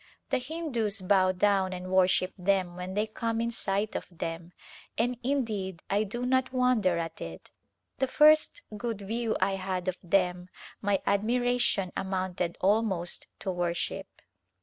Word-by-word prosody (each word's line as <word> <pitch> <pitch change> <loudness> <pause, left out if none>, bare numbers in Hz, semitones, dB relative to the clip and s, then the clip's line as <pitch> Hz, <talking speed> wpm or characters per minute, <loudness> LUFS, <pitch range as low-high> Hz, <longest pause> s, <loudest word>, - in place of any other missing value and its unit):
The 265 - +2
Hindus 250 -8 -1
bow 185 0 +4
down 190 0 +2
and 185 0 -6
worship 185 0 +3
them 185 -1 +1
when 180 +1 -6
they 210 +1 +2
come 225 +1 -2
in 235 0 0
sight 205 -2 -1
of - - -3
them, 165 0 -5 0.5
and 245 +2 +1
indeed 215 -10 -2
I 205 +2 +2
do 240 +5 -3
not 260 0 +2
wonder 250 -9 +2
at 165 -1 -4
it. 80 -1 -8 0.5
The 265 - +2
first 305 - +5
good 225 -1 -4
view 225 +3 -1
I 195 +1 +1
had 185 -1 -3
of 185 -1 -1
them 180 0 +1 0.3
my 200 -1 +1
admiration 235 -2 +2
amounted 185 -2 -2
almost 195 -3 +1
to 190 - -1
worship. 175 +2 -2
195 Hz, 150 wpm, -29 LUFS, 185-235 Hz, 0.5 s, first